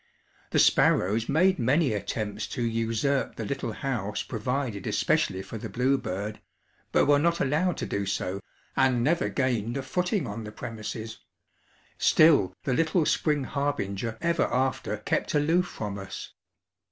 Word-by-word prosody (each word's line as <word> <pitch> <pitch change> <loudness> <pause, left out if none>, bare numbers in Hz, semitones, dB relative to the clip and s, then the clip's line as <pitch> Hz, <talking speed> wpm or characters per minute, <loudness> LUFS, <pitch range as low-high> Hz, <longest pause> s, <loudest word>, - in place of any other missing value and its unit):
The - - 0
sparrows 110 +5 +3
made 180 +5 +3
many 130 +2 +2
attempts 105 0 -3
to 125 - -3
usurp 115 +4 0
the 110 - -4
little 120 -1 -3
house 105 -4 -3
provided 125 -2 -3
especially 95 0 +1
for 110 +3 -7
the 110 - -6
bluebird, 110 -4 -1 0.5
but - - +4
were 145 0 +5
not 170 +2 +2
allowed 155 +6 +1
to - - -3
do 100 -1 -2
so 100 -1 -2 0.4
and 130 -3 +3
never 170 +6 +2
gained 120 -3 -1
a 135 - -3
footing 180 +5 -1
on 110 0 -5
the 105 - -7
premises; 110 0 -6 0.8
still 155 - +5
the 130 - 0
little 165 +3 +2
spring 150 -2 +1
harbinger 120 -7 -2
ever 170 -2 +1
after 130 +1 0
kept - - -1
aloof 165 +5 +2
from 105 - -5
us. 95 - -7
125 Hz, 145 wpm, -27 LUFS, 105-145 Hz, 0.8 s, were